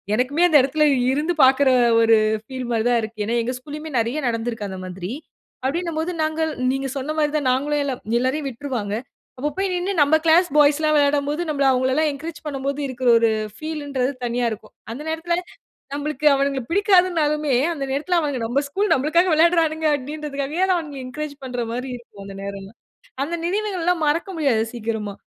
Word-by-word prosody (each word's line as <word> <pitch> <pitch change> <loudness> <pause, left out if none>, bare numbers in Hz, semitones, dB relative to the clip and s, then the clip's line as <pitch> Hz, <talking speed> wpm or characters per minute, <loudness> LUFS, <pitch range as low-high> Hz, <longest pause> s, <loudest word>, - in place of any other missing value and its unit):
எனக்குமே 285 +8 +2
அந்த 315 -4 +6
எடத்துல 300 +3 +2 0.3
இருந்து 310 +5 0
பாக்குற 265 +1 +5 0.3
ஒரு 225 -1 +5 0.3
ஃபீல் 255 +1 -6
மாரி 225 -1 +1
தான் 240 -1 +3
இருக்கு. 215 -1 -5
ஏன்னா 235 +3 0
எங்க 250 +2 -2
ஸ்கூலயுமே 300 +3 -8
நெறைய 235 +6 -1
நடந்துருக்கு 230 -2 -3
அந்த 190 -1 -6
மாதிரி. 185 +1 -6 0.5
அப்டின்னும்போது 330 +3 -1
நாங்கள் 315 0 -1 0.2
நீங்க 270 0 -2
சொன்ன 275 +3 -3
மாதிரி 295 -1 +2
தான் 270 -3 0
நாங்களும் 290 +2 0
எல்லாம் 270 -3 -3 0.2
எல்லாரையும் 270 +4 -1
விட்டுருவாங்க. 235 -5 -4 0.4
அப்பப்போய் 365 +8 -2
நின்னு 360 +2 -1
நம்ம 290 +2 +5
கிளாஸ் 335 +3 +5
பாய்ஸ்லாம் 300 +1 +4
விளையாடும்போது 290 +2 +1
நம்பள 285 -3 0
அவங்களலாம் 260 +4 +2
என்கரேஜ் 310 +3 -7
பண்ணும்போது 280 0 -3
இருக்குற 255 -1 -3
ஒரு 230 -1 +3 0.3
ஃபீலுன்றது 285 -3 -3
தனியா 240 +1 -1
இருக்கும். 215 - -8 0.2
அந்த 260 +6 -6
நேரத்துல 335 +2 -1 0.6
நம்பளுக்கு 295 0 -3
அவனுங்கள 275 -1 0
பிடிக்காதுன்னாலுமே, 335 -6 +2 0.2
அந்த 285 - -5
நேரத்துல 310 +6 0
அவனுங்க 290 -5 -2
நம்ப 245 +5 +1
ஸ்கூல், 400 +9 -1
நம்பளுக்காக 335 +6 +2
விளையாடுறானுங்க 320 -1 +3
அப்டின்றதுக்காகவே 295 +3 -3
நான் 365 - +3
அவங்கள 290 -4 -7
என்கரேஜ் 300 +3 -5
பண்ற 245 -1 -3
மாதிரி 250 +2 -4
இருக்கும் 215 -4 -14
அந்த 195 0 -9
நேரம்லாம். 200 +2 -8 0.5
அந்த 340 +3 -4
நினைவுகள்லாம் 360 -3 0
மறக்க 330 +6 0
முடியாது 255 -8 +2
சீக்கிரமா. 220 -3 -3
285 Hz, 160 wpm, -22 LUFS, 255-315 Hz, 0.6 s, அந்த